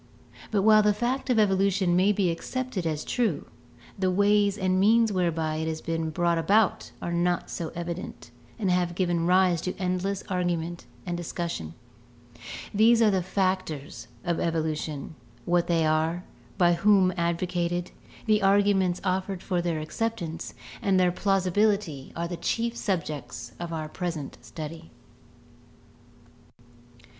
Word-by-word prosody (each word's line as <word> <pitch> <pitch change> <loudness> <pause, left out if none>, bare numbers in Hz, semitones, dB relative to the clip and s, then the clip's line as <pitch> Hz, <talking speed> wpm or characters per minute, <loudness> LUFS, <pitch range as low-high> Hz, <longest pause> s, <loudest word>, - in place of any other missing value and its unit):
But 205 -3 +1
while 215 0 +7
the 210 -1 +3
fact 250 +4 -1
of 245 - +3
evolution 195 -3 +3
may 190 +3 +4
be 195 -4 +1
accepted 220 +1 -3
as 155 -2 -2
true, 225 - 0 0.5
the 190 -1 +2
ways 205 +1 +3
and 185 -1 +1
means 225 +3 +4
whereby 165 -4 0
it 160 0 -2
has 160 0 -2
been 165 -1 -2
brought 170 +1 +1
about 200 +5 +2
are 170 - -2
not 175 0 0
so 165 -2 -4
evident 175 +1 -6 0.3
and 200 -5 0
have 175 -1 +1
given 175 -2 0
rise 180 -2 +4
to 180 - -4
endless 185 +1 -1
argument 175 -2 -2 0.2
and 175 -1 -2
discussion. 170 - -4 1.0
These 225 +3 +5
are 215 - +5
the 190 -1 +1
factors 185 -6 -2 0.2
of 170 -3 -1
evolution; 155 -3 -2 0.3
what 175 0 +2
they 165 -2 +2
are, 160 +3 +1 0.3
by 175 -2 +5
whom 190 0 +4
advocated, 175 +1 -1 0.3
the 215 -1 +3
arguments 195 -2 +3
offered 190 0 -1
for 180 -3 0
their 170 -2 -1
acceptance, 170 0 -4 0.3
and 190 -2 +3
their 180 -1 +4
plausibility 195 -5 +1
are 170 +1 -2
the 175 0 -5
chief 235 +5 -1
subjects 155 - -3
of 175 -1 -5
our 155 -2 -3
present 165 -4 -5
study. 160 +1 -8
180 Hz, 140 wpm, -27 LUFS, 165-200 Hz, 1.0 s, while